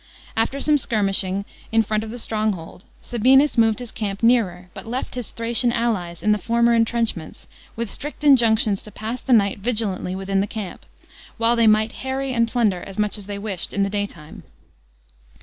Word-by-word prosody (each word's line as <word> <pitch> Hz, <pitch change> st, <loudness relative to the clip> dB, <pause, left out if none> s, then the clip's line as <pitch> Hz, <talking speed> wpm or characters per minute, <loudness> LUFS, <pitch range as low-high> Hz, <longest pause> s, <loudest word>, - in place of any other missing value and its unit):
After 230 Hz, +5 st, 0 dB
some 295 Hz, +1 st, +3 dB
skirmishing 200 Hz, -4 st, 0 dB, 0.3 s
in 225 Hz, 0 st, +4 dB
front 215 Hz, 0 st, -1 dB
of 220 Hz, -, -7 dB
the 240 Hz, -, -6 dB
stronghold, 215 Hz, -7 st, -3 dB, 0.2 s
Sabinus 260 Hz, +5 st, +3 dB
moved 225 Hz, -2 st, +3 dB
his 245 Hz, -2 st, -7 dB
camp 200 Hz, -1 st, -4 dB
nearer, 190 Hz, -7 st, +2 dB
but -, -, -10 dB
left 250 Hz, +3 st, -4 dB
his 245 Hz, -3 st, -4 dB
Thracian 235 Hz, +1 st, +1 dB
allies 200 Hz, -8 st, -2 dB
in 215 Hz, -, +3 dB
the 210 Hz, -, +2 dB
former 235 Hz, +3 st, +2 dB
entrenchments, 225 Hz, -7 st, -1 dB, 0.3 s
with 235 Hz, 0 st, -3 dB
strict 295 Hz, +8 st, -5 dB
injunctions 225 Hz, -7 st, +4 dB
to 210 Hz, -, -10 dB
pass 220 Hz, +4 st, -5 dB
the -, -, -4 dB
night 200 Hz, -4 st, +3 dB
vigilantly 200 Hz, -5 st, -1 dB
within 195 Hz, 0 st, -1 dB
the 200 Hz, -, 0 dB
camp, 205 Hz, -3 st, -7 dB, 0.5 s
while 230 Hz, +1 st, +2 dB
they 230 Hz, -1 st, +4 dB
might 215 Hz, +1 st, +4 dB
harry 265 Hz, 0 st, -2 dB
and 230 Hz, -1 st, +2 dB
plunder 220 Hz, -7 st, +1 dB
as 195 Hz, +1 st, -10 dB
much 210 Hz, -1 st, 0 dB
as 205 Hz, -2 st, -6 dB
they 205 Hz, -1 st, -5 dB
wished 200 Hz, -4 st, -5 dB
in 200 Hz, -, +1 dB
the 195 Hz, -, -1 dB
daytime. 200 Hz, -7 st, -5 dB
220 Hz, 185 wpm, -22 LUFS, 200-235 Hz, 0.5 s, in